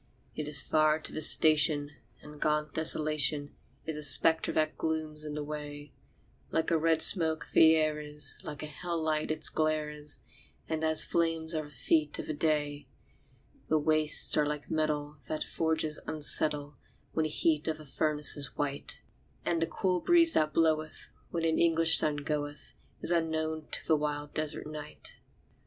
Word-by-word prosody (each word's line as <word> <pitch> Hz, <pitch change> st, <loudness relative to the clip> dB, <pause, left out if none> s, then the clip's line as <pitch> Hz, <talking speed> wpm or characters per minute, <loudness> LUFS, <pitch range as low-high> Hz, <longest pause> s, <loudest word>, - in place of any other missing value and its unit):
It 150 Hz, -, -5 dB
is 140 Hz, -2 st, +3 dB
far 155 Hz, 0 st, +1 dB
to 160 Hz, -, -6 dB
the 155 Hz, -, -5 dB
station, 150 Hz, -1 st, +4 dB, 0.3 s
and 150 Hz, 0 st, -13 dB
gaunt 150 Hz, -1 st, -1 dB
Desolation 155 Hz, -2 st, +2 dB, 0.3 s
Is 160 Hz, -1 st, -4 dB
a -, -, -4 dB
spectre 160 Hz, +3 st, +4 dB
that 155 Hz, 0 st, -1 dB
glooms 155 Hz, -1 st, -4 dB
in 150 Hz, -1 st, -7 dB
the 150 Hz, -, -5 dB
way; 145 Hz, -1 st, -8 dB, 0.6 s
Like 160 Hz, +1 st, -2 dB
a 165 Hz, -, +2 dB
red 160 Hz, 0 st, +2 dB
smoke 160 Hz, -4 st, +8 dB
the 160 Hz, 0 st, +6 dB
air 155 Hz, -1 st, -1 dB
is, 150 Hz, 0 st, -3 dB
like 150 Hz, 0 st, -8 dB
a -, -, -4 dB
hell 170 Hz, +3 st, -5 dB
light 155 Hz, -1 st, -2 dB
its 155 Hz, -, 0 dB
glare 155 Hz, -1 st, -2 dB
is, 150 Hz, 0 st, -6 dB, 0.5 s
And 160 Hz, 0 st, -4 dB
as 160 Hz, 0 st, +2 dB
flame 165 Hz, -1 st, -1 dB
are 155 Hz, -1 st, -3 dB
the -, -, -14 dB
feet 150 Hz, +3 st, -1 dB
of -, -, -6 dB
the 155 Hz, -, -5 dB
day. 145 Hz, -1 st, -2 dB, 0.8 s
The 155 Hz, -, +2 dB
wastes 155 Hz, 0 st, +3 dB
are 150 Hz, -, +2 dB
like 150 Hz, 0 st, -6 dB
metal 150 Hz, -1 st, -3 dB
that 155 Hz, -, -4 dB
forges 160 Hz, -1 st, -2 dB
unsettle 150 Hz, -1 st, +1 dB, 0.4 s
When 160 Hz, -, -1 dB
the -, -, -3 dB
heat 155 Hz, 0 st, -1 dB
of 160 Hz, -1 st, -2 dB
the 155 Hz, -, -13 dB
furnace 150 Hz, +1 st, 0 dB
is 140 Hz, -3 st, -4 dB
white; 145 Hz, -1 st, -5 dB, 0.4 s
And 165 Hz, -1 st, -1 dB
the 165 Hz, -, 0 dB
cool 185 Hz, -2 st, -2 dB
breeze 335 Hz, -1 st, +4 dB
that 155 Hz, -1 st, +1 dB
bloweth 155 Hz, -1 st, -1 dB, 0.2 s
when 165 Hz, -1 st, -3 dB
an 160 Hz, -1 st, 0 dB
English 165 Hz, -1 st, +4 dB
sun 150 Hz, -1 st, -1 dB
goeth, 145 Hz, 0 st, -6 dB, 0.3 s
Is -, -, +1 dB
unknown 160 Hz, -2 st, -2 dB
to -, -, -6 dB
the 160 Hz, -, +2 dB
wild 145 Hz, -1 st, -4 dB
desert 155 Hz, -1 st, -3 dB
night. 150 Hz, 0 st, -10 dB
155 Hz, 175 wpm, -29 LUFS, 150-160 Hz, 0.8 s, smoke